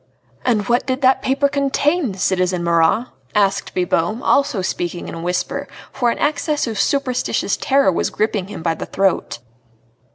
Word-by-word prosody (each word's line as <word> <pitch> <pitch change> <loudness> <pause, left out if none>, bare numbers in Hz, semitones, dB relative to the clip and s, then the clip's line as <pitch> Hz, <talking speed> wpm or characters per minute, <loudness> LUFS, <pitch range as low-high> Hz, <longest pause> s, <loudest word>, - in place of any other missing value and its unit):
"And 215 -5 +1
what 240 +3 +1
did 260 0 -1
that 260 +1 +4
paper 275 +1 +2
contain, 280 - 0
citizen 185 -2 0
Marat?" 170 +7 +2 0.3
asked 200 -2 +1
Bibot, 180 +5 0
also 275 -9 +2
speaking 175 -1 -3
in - - -7
a 165 - -6
whisper, 225 +11 -2 0.2
for 245 -3 +1
an - - -1
access 295 0 0
of 225 -4 -4
superstitious 255 +2 0
terror 275 -7 +2
was 170 - 0
gripping 210 -3 -1
him 200 -5 -8
by 165 -1 +1
the - - -7
throat. 195 -1 0
220 Hz, 160 wpm, -19 LUFS, 185-275 Hz, 0.3 s, that